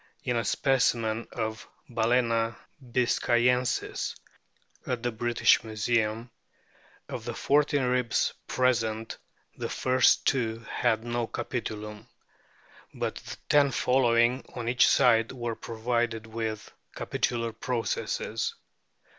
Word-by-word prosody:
In 125 - -1
a 115 - +1
specimen 115 -2 +1
of 110 0 -4 0.2
Balccna 115 -1 +1 0.3
biscayensis 125 0 +1 0.7
at 125 -2 -2
the 120 - 0
British 120 0 +3
Museum, 110 +1 -1 0.8
of - - -6
the - - -5
fourteen 145 0 +2
ribs 125 -1 +1
present 115 -3 0 0.4
the - - -4
first 130 -1 +3
two 115 -3 0
had 110 -2 0
no 120 -1 -2
capitulum; 105 -4 -5 0.9
but - - -3
the - - -8
ten 145 -1 +5
following 125 -1 +2
on 120 -2 -4
each 120 0 +4
side 115 -4 +4
were 120 -3 -3
provided 115 0 -2
with 110 -1 -4 0.2
capitular 115 -1 -1
processes. 120 -3 -2
120 Hz, 105 wpm, -28 LUFS, 115-125 Hz, 0.9 s, ten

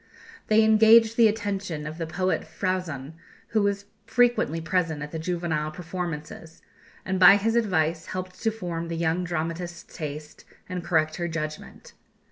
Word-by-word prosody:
They 220 +1 +5
engaged 220 +1 +6
the 230 -1 +6
attention 200 -7 -3
of 155 +2 -7
the 165 - -3
poet 185 +3 -1
Frauzon, 170 -7 -3 0.4
who 220 - +2
was 200 0 0 0.2
frequently 240 -10 +2
present 165 -3 -1
at 150 - -7
the 160 - -4
juvenile 165 -3 -2
performances, 165 -1 -7 0.4
and 190 -1 -1
by 190 +1 +9
his 225 +3 0
advice 170 -8 +1
helped 185 0 -6
to 225 - +2
form 175 -6 -4
the 165 0 -4
young 165 +2 0
dramatist's 170 +1 -4
taste, 150 -1 -7 0.2
and 180 -1 -4
correct 155 -2 +1
her 175 - -2
judgment. 155 -2 -6
175 Hz, 150 wpm, -26 LUFS, 160-200 Hz, 0.4 s, by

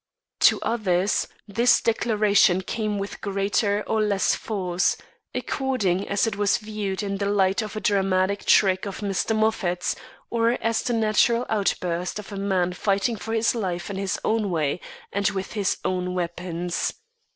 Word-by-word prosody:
To - - -2
others, 200 -4 +1 0.2
this 235 +4 +4
declaration 210 -5 +3
came 215 +1 -2
with 200 0 -5
greater 200 +1 0
or 220 - 0
less 205 -2 +2
force, 185 -4 0 0.4
according 210 -9 -1
as 200 +2 +2
it 225 -1 -2
was 205 -1 +2
viewed 210 -3 -4
in 200 -1 -3
the 200 - 0
light 195 0 +2
of 215 -1 -6
a - - -2
dramatic 195 0 +1
trick 190 0 +4
of 195 - -6
Mr. 205 +2 0
Moffat's, 205 -5 0 0.4
or 230 0 +2
as 230 0 0
the 245 - -1
natural 230 +2 +2
outburst 180 -4 -1
of 210 0 -8
a - - -5
man 190 -3 0
fighting 200 +4 0
for 225 +1 -6
his 225 0 +2
life 185 -5 -3
in 195 - -4
his 195 -1 -2
own 220 -2 +1
way 160 -1 -1 0.3
and 200 +1 +2
with 195 -1 -4
his 205 -3 0
own 180 0 -1
weapons. 175 0 -2
200 Hz, 160 wpm, -24 LUFS, 185-215 Hz, 0.4 s, this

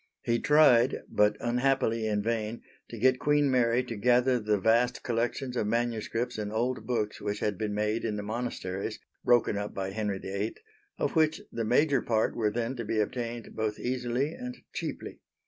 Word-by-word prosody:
He 115 0 +1
tried 135 -4 +5
but 105 0 +3
unhappily 120 -2 +1
in 105 -1 0
vain 115 0 -2 0.3
to 115 - -7
get 130 +3 +3
Queen 145 -1 +3
Mary 125 -1 +3
to 120 -2 -6
gather 125 +3 +3
the 105 -1 +1
vast 115 +4 +2
collections 120 +2 -1
of 110 - 0
manuscripts 115 +1 -1
and 105 -1 -3
old 120 +4 -1
books 110 -4 -1
which 105 0 -2
had 105 -1 -1
been 105 +1 -3
made 105 +2 0
in 110 -2 -1
the 105 - -4
Monasteries 105 -4 -4 0.3
(broken 120 -4 +3
up 105 0 -5
by 95 0 -3
Henry 105 -1 -2
VIII) 100 +3 -3 0.4
of - - -1
which 160 -1 +3
the 115 -1 -2
major 135 +3 +3
part 110 -1 +1
were 110 -2 +1
then 120 +4 -2
to 120 - -3
be 110 0 -1
obtained 115 +1 -3
both 110 -1 -1
easily 125 +4 -1
and 250 +5 -7 0.2
cheaply. - - -5
115 Hz, 180 wpm, -29 LUFS, 105-125 Hz, 0.4 s, tried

